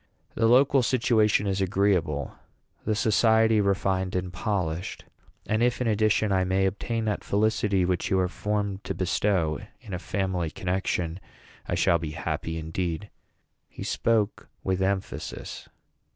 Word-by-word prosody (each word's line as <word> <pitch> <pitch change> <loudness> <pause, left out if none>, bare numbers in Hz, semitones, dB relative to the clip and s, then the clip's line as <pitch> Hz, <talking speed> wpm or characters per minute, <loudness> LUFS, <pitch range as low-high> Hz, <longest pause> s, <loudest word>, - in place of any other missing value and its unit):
The 115 - +2
local 135 +3 +5
situation 115 -4 +2
is 95 -1 0
agreeable, 90 -7 +1 0.5
the 110 - +1
society 110 -1 +4
refined 95 -1 0
and 90 -1 -2
polished; 90 -3 -2 0.4
and 110 +1 0
if, 120 0 +2
in 125 - 0
addition, 110 -1 +2
I 95 -1 +3
may 95 +1 +1
obtain 110 +4 -2
that 105 -1 -1
felicity 100 -2 +1
which 90 -1 -1
you 95 - +2
are 90 - +2
formed 100 +1 -2
to - - -3
bestow 90 -4 +1 0.2
in 100 - -10
a 90 - -2
family 95 -3 -2
connection, 90 -1 -2 0.5
I - - -1
shall 85 - +3
be 80 -2 -5
happy 80 0 -3
indeed." 80 +4 -3 0.6
He - - -8
spoke 110 -3 0
with 95 0 0
emphasis. 95 0 -3
95 Hz, 140 wpm, -26 LUFS, 90-110 Hz, 0.6 s, local